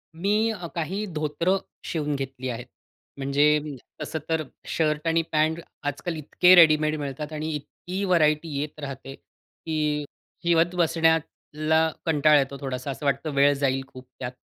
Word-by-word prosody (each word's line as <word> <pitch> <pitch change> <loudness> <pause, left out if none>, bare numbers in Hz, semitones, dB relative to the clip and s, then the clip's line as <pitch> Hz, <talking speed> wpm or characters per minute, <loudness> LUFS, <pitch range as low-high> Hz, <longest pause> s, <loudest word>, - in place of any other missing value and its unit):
मी 210 +6 +1
अ, 180 -6 -6
काही 185 +6 -2
धोतरं 160 +2 0 0.3
शिवून 150 -3 -2
घेतली 135 -1 -4
आहेत. 120 0 -5 0.5
म्हणजे 145 +2 +3 0.4
तसं 160 - -3
तर 160 -1 +1 0.2
शर्ट 155 0 0
आणि 165 0 +3
पॅन्ट 155 +1 +2 0.3
आजकाल 155 +4 -3
इतके 180 +4 +4
रेडीमेड 155 -2 +6
मिळतात 145 +2 -5
आणि 155 +1 -3
इतकी 180 +6 -6
व्हरायटी 155 -3 +3
येत 150 +1 -5
राहते 135 -2 -7
की 150 -2 -4 0.4
शिवत 170 +1 +3
बसण्याला 160 -1 +1 0.2
कंटाळा 150 -2 +5
येतो 140 0 -2
थोडासा, 130 0 -3
असं 145 +2 -7
वाटतं 140 +3 0
वेळ 140 +1 +5
जाईल 135 -1 0
खूप 130 -1 -12
त्यात. 125 -1 -4
155 Hz, 140 wpm, -25 LUFS, 140-165 Hz, 0.5 s, रेडीमेड